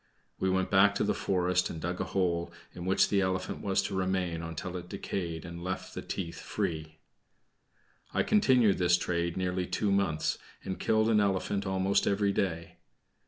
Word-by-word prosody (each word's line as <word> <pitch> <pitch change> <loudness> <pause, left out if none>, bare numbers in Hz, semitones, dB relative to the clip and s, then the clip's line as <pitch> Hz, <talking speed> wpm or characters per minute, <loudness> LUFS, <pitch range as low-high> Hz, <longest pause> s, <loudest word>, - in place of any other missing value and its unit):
We 95 - +1
went 95 0 0
back 100 +1 +5
to - - +1
the - - +1
forest 90 -1 +1
and 80 - -6
dug 90 +2 -3
a - - -1
hole, 85 -3 0 0.2
in 90 - -7
which 95 +1 +3
the 100 -1 +3
elephant 95 -1 -2
was 95 -2 +1
to 100 - -3
remain 95 -3 -1
until 85 +2 -5
it 90 -1 -6
decayed 85 -5 -4
and 85 0 -7
left 95 +1 -4
the - - -5
teeth 85 -3 -5
free. 80 -1 -3 1.1
I - - +1
continued 130 - +4
this 90 0 +4
trade 85 -1 -1
nearly 90 -1 -1
two 100 +3 0
months, 95 -6 +1 0.2
and 95 - -4
killed 110 0 +2
an 110 -2 +4
elephant 100 0 0
almost 95 +1 +1
every 100 0 +2
day. 85 -4 -2
95 Hz, 175 wpm, -30 LUFS, 85-100 Hz, 1.1 s, back